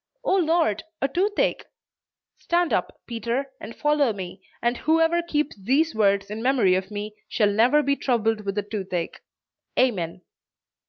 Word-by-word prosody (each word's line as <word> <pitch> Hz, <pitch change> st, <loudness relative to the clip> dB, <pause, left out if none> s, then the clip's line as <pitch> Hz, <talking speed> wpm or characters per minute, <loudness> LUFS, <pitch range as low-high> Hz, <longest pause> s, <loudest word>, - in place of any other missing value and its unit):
'Oh 385 Hz, -, +3 dB
Lord, 325 Hz, -, +2 dB, 0.2 s
a 275 Hz, -, +1 dB
toothache!' 390 Hz, +9 st, 0 dB, 0.7 s
Stand 345 Hz, 0 st, +1 dB
up, -, -, -1 dB
Peter, 235 Hz, +4 st, -3 dB
and 220 Hz, -, -9 dB
follow 295 Hz, -5 st, +2 dB
me; 190 Hz, -1 st, -7 dB, 0.2 s
and 240 Hz, +1 st, 0 dB
whoever 325 Hz, +2 st, +3 dB
keeps 300 Hz, -3 st, -1 dB
these 290 Hz, +9 st, +2 dB
words 200 Hz, -2 st, +2 dB
in 215 Hz, +1 st, -4 dB
memory 245 Hz, -7 st, +3 dB
of 190 Hz, +1 st, -1 dB
me, 210 Hz, 0 st, -5 dB, 0.2 s
shall 210 Hz, -3 st, +2 dB
never 245 Hz, +8 st, +4 dB
be 280 Hz, 0 st, +2 dB
troubled 225 Hz, -5 st, 0 dB
with 200 Hz, 0 st, -3 dB
a 205 Hz, -, +1 dB
toothache, 190 Hz, -5 st, -4 dB, 0.6 s
Amen." 180 Hz, -8 st, +1 dB
235 Hz, 150 wpm, -24 LUFS, 205-295 Hz, 0.7 s, never